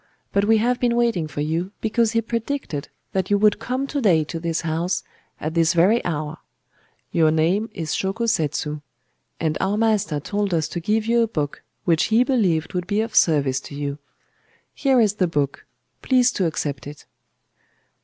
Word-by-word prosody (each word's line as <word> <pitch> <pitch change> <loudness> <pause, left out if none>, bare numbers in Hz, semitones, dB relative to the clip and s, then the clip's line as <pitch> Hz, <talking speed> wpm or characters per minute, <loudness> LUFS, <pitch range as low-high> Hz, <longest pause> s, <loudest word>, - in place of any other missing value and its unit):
But 200 0 +3
we 220 +1 +4
have 245 +3 +1
been 240 -1 +2
waiting 230 -9 +1
for 145 -1 -5
you, 165 +6 -2
because 225 +1 +1
he 230 0 +1
predicted 230 - -3 0.2
that 190 -1 -1
you 205 - +4
would 210 0 +3
come 255 +4 -2
to 280 0 -3
day 175 -9 +4
to 165 +2 -6
this 165 -1 -2
house, 170 +3 -1 0.4
at 155 +1 -3
this 165 +1 +3
very 195 +8 +4
hour. 155 -1 -3 0.7
Your 160 -2 +4
name 170 +8 +1
is 165 -7 -4
Shōko 195 +5 -1
Setsu. 150 -6 -1 0.6
And 155 -2 -1
our 195 +2 +1
master 215 -9 +1
told 200 +3 -1
us 155 -2 0
to 175 - -4
give 215 +5 0
you 235 +1 +3
a 230 - +2
book 150 -9 -3 0.2
which 165 -3 +3
he 225 +2 +4
believed 195 - +1
would 180 -1 -2
be 205 0 0
of 225 0 -4
service 140 -5 +3
to 140 - -10
you. 145 0 -4 0.7
Here 270 -3 +2
is 215 -3 +3
the 190 -3 +1
book;—please 170 - -1
to 185 - 0
accept 145 -4 -3
it. 145 0 -10
185 Hz, 180 wpm, -22 LUFS, 155-225 Hz, 0.7 s, we